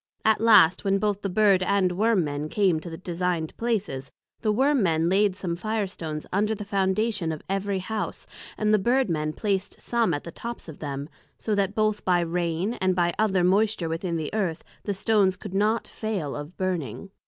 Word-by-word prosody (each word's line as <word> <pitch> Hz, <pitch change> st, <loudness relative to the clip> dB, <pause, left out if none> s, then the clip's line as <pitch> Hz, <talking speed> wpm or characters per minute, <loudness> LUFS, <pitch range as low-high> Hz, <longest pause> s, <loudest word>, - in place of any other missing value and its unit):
At 220 Hz, -1 st, +3 dB
last 205 Hz, -7 st, +6 dB
when 195 Hz, 0 st, +2 dB
both 205 Hz, -1 st, -1 dB
the 200 Hz, -, -2 dB
Bird 195 Hz, -1 st, +4 dB
and 185 Hz, -1 st, +2 dB
Worm 205 Hz, +1 st, +2 dB
men 145 Hz, 0 st, -3 dB
came 190 Hz, -5 st, +2 dB
to 170 Hz, -, -8 dB
the 165 Hz, -, -7 dB
designed 175 Hz, -2 st, -2 dB
places, 205 Hz, -, -2 dB, 0.3 s
the 215 Hz, -, +1 dB
Worm 270 Hz, +4 st, +3 dB
men 165 Hz, -3 st, +2 dB
laid 195 Hz, 0 st, +3 dB
some 180 Hz, -4 st, -3 dB
Fire 215 Hz, +3 st, -1 dB
stones 155 Hz, -5 st, -6 dB
under 210 Hz, +3 st, +1 dB
the 210 Hz, 0 st, -7 dB
Foundation 195 Hz, -2 st, 0 dB
of 155 Hz, -, -6 dB
every 195 Hz, 0 st, -1 dB
House, 215 Hz, +3 st, -4 dB, 0.3 s
and 215 Hz, 0 st, +2 dB
the 215 Hz, -, +5 dB
Bird 240 Hz, +1 st, +2 dB
men 155 Hz, -1 st, -1 dB
placed 195 Hz, +2 st, -2 dB
some 235 Hz, -5 st, +1 dB
at 145 Hz, -, -5 dB
the 170 Hz, -, -8 dB
tops 235 Hz, +4 st, -7 dB
of 160 Hz, -, -10 dB
them, 140 Hz, -1 st, -4 dB, 0.3 s
so 215 Hz, -, -2 dB
that 200 Hz, 0 st, 0 dB
both 215 Hz, -1 st, +1 dB
by 180 Hz, -1 st, +3 dB
rain, 170 Hz, +4 st, -1 dB
and 185 Hz, -1 st, +2 dB
by 175 Hz, -1 st, +2 dB
some 170 Hz, -, -4 dB
other 195 Hz, -4 st, +2 dB
moisture 195 Hz, -1 st, +2 dB
within 170 Hz, +1 st, -2 dB
the 155 Hz, +3 st, -4 dB
Earth, 185 Hz, -7 st, -1 dB, 0.2 s
the 205 Hz, -, -1 dB
stones 195 Hz, -2 st, +2 dB
could 205 Hz, -, -8 dB
not 210 Hz, +3 st, +1 dB
fail 200 Hz, -10 st, -3 dB
of 145 Hz, +4 st, -8 dB
burning. 185 Hz, -, -3 dB
190 Hz, 200 wpm, -26 LUFS, 170-215 Hz, 0.3 s, last